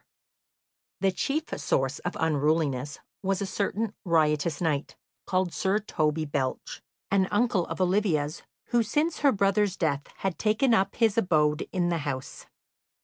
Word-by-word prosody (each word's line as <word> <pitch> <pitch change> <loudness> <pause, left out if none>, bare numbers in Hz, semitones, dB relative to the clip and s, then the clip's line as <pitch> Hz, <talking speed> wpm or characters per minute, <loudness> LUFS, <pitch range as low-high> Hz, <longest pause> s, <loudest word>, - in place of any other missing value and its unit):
The 195 -1 +3
chief 290 - -2
source 135 +2 0
of - - -4
unruliness 150 -3 +1 0.2
was 195 -1 0
a 200 - -1
certain 205 +2 -2
riotous 155 -2 +2
knight, 155 -4 -1 0.3
called 185 -2 0
Sir 195 +1 +1
Toby 155 -6 -1
Belch, 140 -3 -3 0.3
an 195 -1 +3
uncle 205 -5 +1
of - - -5
Olivia's, 180 -5 +1 0.3
who 240 -1 +3
since 300 +9 0
her 285 -2 +5
brother's 200 -1 +1
death 145 -4 -1
had 190 -3 -2
taken 220 +4 +2
up 195 -2 +2
his 225 -2 +3
abode 150 -5 +2
in 175 -2 0
the 170 -1 0
house. 135 -3 -5
180 Hz, 145 wpm, -27 LUFS, 150-205 Hz, 0.3 s, her